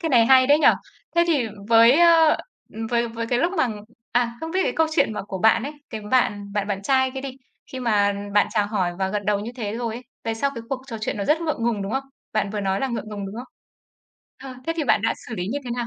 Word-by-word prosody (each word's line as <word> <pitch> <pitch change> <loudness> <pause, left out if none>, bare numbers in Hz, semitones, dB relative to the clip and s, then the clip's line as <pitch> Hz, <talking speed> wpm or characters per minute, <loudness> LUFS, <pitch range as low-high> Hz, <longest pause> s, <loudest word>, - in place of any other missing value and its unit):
Cái 330 - -1
này 235 -5 +5
hay 260 0 +6
đấy 290 +2 +5
nhỉ. - - +3 0.5
Thế 340 - +5
thì 290 -9 +2 0.2
với, 230 +1 +7
a, 330 -2 +6 0.5
với 235 0 +1
với 230 0 -5
cái 245 +1 0
lúc 340 +7 +1
mà 260 - +1 0.4
à, 240 0 +1
không 320 - -5
biết 375 +3 0
cái - - 0
câu 320 0 +3
chuyện 220 - +2
mà 210 - -4
của 195 -1 -6
bạn 225 +3 +4
ấy, 285 +3 -4 0.2
cái 220 - -5
bạn 205 -5 +1
bạn 205 -1 -1
bạn 195 -1 -2
trai 260 +2 +2
kia 265 0 -6
đi, 265 -1 -7 0.4
khi 260 - -5
mà 205 -4 +2 0.2
bạn 205 - +5
chào 210 -2 +1
hỏi 190 -5 -1
và 190 0 0
gật 205 0 -3
đầu 205 -1 +1
như 220 - -5
thế 215 -3 -4
rồi 230 -2 -3
ấy, 245 - -7 0.2
về 225 0 -1
sau 280 +5 0
cái 230 - -6
cuộc 260 -1 -3
trò 230 -4 -6
chuyện 215 - -2
nó 200 - -2
rất 315 +2 +2
ngượng 310 -8 -2
ngùng, 225 -4 0
đúng 195 - -4
không? 270 0 -1 0.3
Bạn 215 -2 0
vừa 210 0 -3
nói 195 0 -1
là 270 - 0
ngượng 235 -3 -4
ngùng, 205 -2 -5
đúng 195 - -8
không? 245 +1 -9 0.9
Ờ, 265 -1 -8
thế 330 - +1
thì 315 - -1
bạn 220 - +3
đã 225 - +1
xử 225 - -5
lý 180 - -3
như 285 - -2
thế 245 - -6
nào? 240 -1 -2
235 Hz, 275 wpm, -23 LUFS, 210-265 Hz, 0.9 s, với